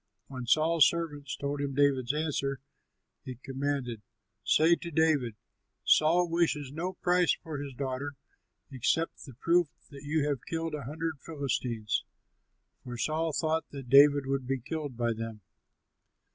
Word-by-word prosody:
When 130 -3 -6
Saul's 155 +3 +5
servants 150 -5 -4
told 140 0 -3
him 140 -1 -3
David's 135 -3 +3
answer, 140 -3 -1 0.6
he 130 - -6
commanded, 135 -2 -3 0.4
"Say 160 +7 +5
to 170 - -7
David: 150 -8 +2 0.5
'Saul 170 +3 +4
wishes 165 -5 0
no 175 +5 -3
price 180 -1 +2
for 155 -4 -5
his 140 -2 -6
daughter 140 +2 -3 0.6
except 140 +6 -1
the 135 -5 -12
proof 170 +5 +3 0.2
that 140 -1 -10
you 150 0 0
have 140 -5 -2
killed 165 -1 -2
a 145 -4 -4
hundred 160 +2 -4
Philistines;'" 125 -8 -2 0.8
for 125 -1 -6
Saul 160 +5 0
thought 160 +1 0
that 135 -3 -9
David 140 0 +7
would 135 -1 -2
be 135 0 0
killed 145 -1 -5
by 120 -1 +1
them. 115 -1 -6
145 Hz, 145 wpm, -30 LUFS, 130-160 Hz, 0.8 s, David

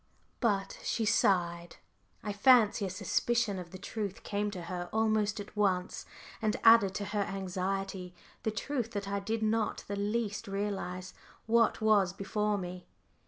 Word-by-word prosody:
But 200 -5 0
she 225 - -1
sighed. 175 -5 +2 0.5
I 210 - -3
fancy 215 -2 +5
a - - -4
suspicion 215 +2 0
of 175 -1 -8
the 185 - -9
truth 200 0 -5
came 205 0 -1
to 185 -4 -6
her 175 0 -5
almost 215 -1 +1
at 205 - -8
once 190 -3 0 0.3
and 215 -1 0
added 225 -4 +7
to 205 - -2
her 205 0 -1
anxiety 190 -1 -3 0.3
the - - 0
truth 235 +1 -3
that 200 -1 -3
I 200 0 -1
did 220 +3 -2
not 220 0 0
the 200 - -3
least 210 +1 -2
realise 195 -2 -3 0.3
what 230 0 +3
was 205 -4 +4
before 210 +1 -1
me. 180 -1 -6
205 Hz, 155 wpm, -31 LUFS, 190-220 Hz, 0.5 s, added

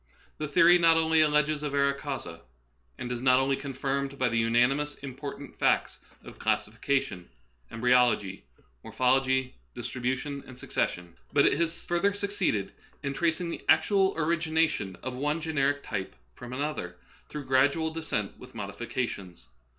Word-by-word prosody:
The 150 - -2
theory 170 +4 +6
not 165 -1 +5
only 160 0 +3
alleges 150 0 +2
a 150 - -2
vera 140 0 +2
causa, 135 - -6 0.6
and 125 - -5
is 120 -1 -3
not 130 0 +5
only 135 +1 +2
confirmed 140 0 -3
by 125 -2 +2
the 115 - -1
unanimous 125 +6 +2
import 140 +1 -6
of 140 - -9
the - - -27
facts - - +2 0.2
of - - -12
classification, 100 -10 -1 0.4
embry©logy, 120 -5 +2 0.4
morphology, 130 0 +1 0.2
distribution, 130 +3 -3
and 130 - -11
succes - - 0
sion; 85 -1 -11 0.2
but 140 - +5
it - - +4
has 165 +2 -1
further 175 +4 +1
succeeded 200 - -1 0.3
in 140 -1 -2
tracing 170 +4 0
the - - -6
actual 195 -3 +4
origination 160 - 0
of 130 - -4
one 150 +5 -1
generic 145 -3 0
type 95 - -4 0.2
from 120 - -10
an 130 +2 -3
other, 90 -13 -4 0.3
through 150 -2 -6
gradual 140 +5 +2
" - - -12
descent 160 -11 -3
with 125 - -13
modifica 110 +4 -3
tions." 85 - -10
140 Hz, 160 wpm, -28 LUFS, 125-155 Hz, 0.6 s, theory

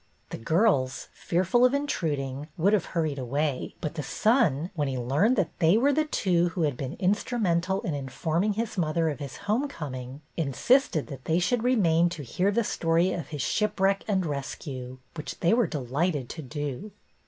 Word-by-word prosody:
The - - -5
girls, 135 - +1
fearful 185 +8 +1
of 255 +2 +5
intruding, 145 - -2
would 190 +5 +3
have 210 - +2
hurried 155 -5 -2
away, 140 +2 -2
but 150 - -3
the 160 - -3
son, 180 - +2
when 150 -4 -1
he 130 -1 -2
learned 145 - +2
that 195 -8 0
they 165 +5 +5
were 280 +5 +3
the 310 +2 +2
two 175 - +1
who 170 0 -2
had 145 -4 +1
been 135 +5 -5
instru 210 +6 0
mental 185 -1 +1
in 165 - -2
informino: 160 +8 -1
his 225 -2 -2
mother 160 0 +1
of 145 - -4
his 140 -3 -7
home 225 +8 +1
coming, 130 - -7
insisted 165 - +2
that 135 -4 -9
they 160 - +2
should 220 +7 +1
remain 175 -9 +3
to 165 -4 -6
hear 180 +10 0
the 230 +3 +1
story 170 -1 +1
of 170 -6 -4
his 145 -4 -4
shipwreck 195 -2 +1
and 190 -4 +1
rescue, 135 -3 -5 0.2
which 150 -2 -7
they 175 - +3
were 240 0 +3
delighted 145 0 -1
to 160 - -6
do. 145 +6 -5
165 Hz, 185 wpm, -27 LUFS, 140-200 Hz, 0.2 s, of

